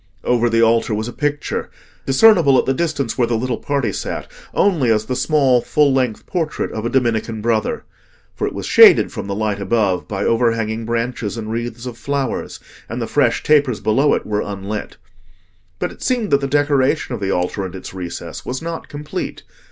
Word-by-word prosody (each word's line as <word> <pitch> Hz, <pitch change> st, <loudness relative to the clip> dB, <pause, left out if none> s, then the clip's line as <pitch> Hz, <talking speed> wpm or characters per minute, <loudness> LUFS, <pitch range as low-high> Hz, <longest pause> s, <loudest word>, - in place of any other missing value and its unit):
Over 120 Hz, -1 st, +2 dB
the 115 Hz, 0 st, +3 dB
altar 115 Hz, -1 st, +2 dB
was 110 Hz, +2 st, -3 dB
a 120 Hz, -, -6 dB
picture, 145 Hz, 0 st, -2 dB, 0.4 s
discernible 140 Hz, -1 st, +5 dB
at -, -, +2 dB
the 135 Hz, -, +1 dB
distance 140 Hz, -5 st, -2 dB
where 120 Hz, -, +3 dB
the 115 Hz, -, 0 dB
little 125 Hz, 0 st, -2 dB
party 140 Hz, -8 st, -1 dB
sat -, -, -4 dB, 0.3 s
only 165 Hz, -12 st, +2 dB
as 110 Hz, -1 st, +2 dB
the 130 Hz, -, -2 dB
small 135 Hz, -4 st, +3 dB
full 145 Hz, +1 st, +2 dB
length 125 Hz, -5 st, -1 dB
portrait 165 Hz, -4 st, -2 dB
of 110 Hz, +1 st, -3 dB
a -, -, -1 dB
Dominican 115 Hz, -3 st, 0 dB
Brother. 110 Hz, 0 st, -1 dB, 0.5 s
For -, -, -2 dB
it -, -, -4 dB
was -, -, -5 dB
shaded -, -, +7 dB
from -, -, -6 dB
the 100 Hz, -, -3 dB
light 105 Hz, -1 st, -1 dB
above 100 Hz, -3 st, 0 dB
by 100 Hz, -1 st, -3 dB
overhanging 115 Hz, -1 st, +1 dB
branches 115 Hz, -2 st, -2 dB
and 110 Hz, -1 st, -5 dB
wreaths 120 Hz, +1 st, -4 dB
of 120 Hz, -2 st, -7 dB
flowers, 140 Hz, +1 st, -3 dB, 0.3 s
and -, -, -4 dB
the -, -, -2 dB
fresh -, -, +1 dB
tapers 145 Hz, -6 st, +3 dB
below 135 Hz, +7 st, +2 dB
it -, -, -4 dB
were 105 Hz, 0 st, -1 dB
unlit. 100 Hz, +1 st, -5 dB, 0.8 s
But -, -, -2 dB
it -, -, -15 dB
seemed 245 Hz, -5 st, 0 dB
that 140 Hz, -, +4 dB
the 140 Hz, -, -1 dB
decoration 145 Hz, -1 st, +1 dB
of 115 Hz, -, -5 dB
the 95 Hz, -, -1 dB
altar 90 Hz, +2 st, -1 dB
and 95 Hz, 0 st, -6 dB
its 95 Hz, -, -8 dB
recess 85 Hz, -2 st, -6 dB
was 130 Hz, +1 st, -4 dB
not 165 Hz, 0 st, -6 dB
complete. 150 Hz, +1 st, -5 dB
120 Hz, 195 wpm, -19 LUFS, 110-140 Hz, 0.8 s, shaded